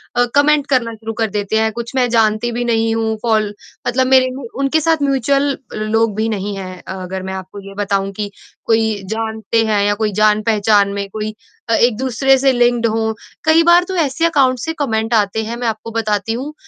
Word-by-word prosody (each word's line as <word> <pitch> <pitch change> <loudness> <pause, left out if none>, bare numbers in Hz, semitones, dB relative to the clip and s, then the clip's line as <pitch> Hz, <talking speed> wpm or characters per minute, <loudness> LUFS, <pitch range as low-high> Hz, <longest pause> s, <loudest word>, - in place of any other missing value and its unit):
अ, 245 - +3
comment 290 0 +3
करना 245 -4 +1
शुरू 225 0 -6
कर 225 -1 -1
देते 210 +1 -1
हैं। 220 0 +1
कुछ 235 +3 -7
मैं 250 -1 +2
जानती 225 0 +2
भी 240 +1 -2
नहीं 225 -1 +1
हूँ, 220 -1 -1
फॉल 215 -3 +1 0.3
मतलब 255 +1 +1
मेरे 260 -1 +5
में 270 - -7 0.2
उनके 275 +3 +2
साथ 320 0 +1
म्यूच्यूअल 275 +1 +1 0.2
लोग 215 0 0
भी 220 +1 0
नहीं 205 -1 -3
हैं, 185 -1 -7
अगर 190 0 -5
मैं 190 - -5
आपको 190 +1 -8
ये 195 - -9
बताऊँ 195 -1 -1
कि 205 +1 -4 0.4
कोई 220 -2 +1
जानते 220 0 -1
हैं 210 -2 +1
या 205 0 +2
कोई 215 0 -1
जान-पहचान 210 -1 +3
में 200 0 -3
कोई 215 +1 -4 0.4
अ, 230 - +2
एक-दूसरे 255 +3 +2
से 270 +1 +3
लिंक्ड 240 -1 +2
हों। 220 0 -1 0.3
कई 320 +1 +5
बार 345 +1 +6
तो 375 - -4
ऐसे 285 +5 -1
अकाउंट 265 -6 +2
से 320 +6 -3
कमेंट 225 -4 -1
आते 220 0 +1
हैं, 230 +2 -4
मैं 245 - -2
आपको 225 +1 -4
बताती 215 -1 -1
हूँ 270 +6 -5
225 Hz, 200 wpm, -17 LUFS, 215-255 Hz, 0.4 s, बार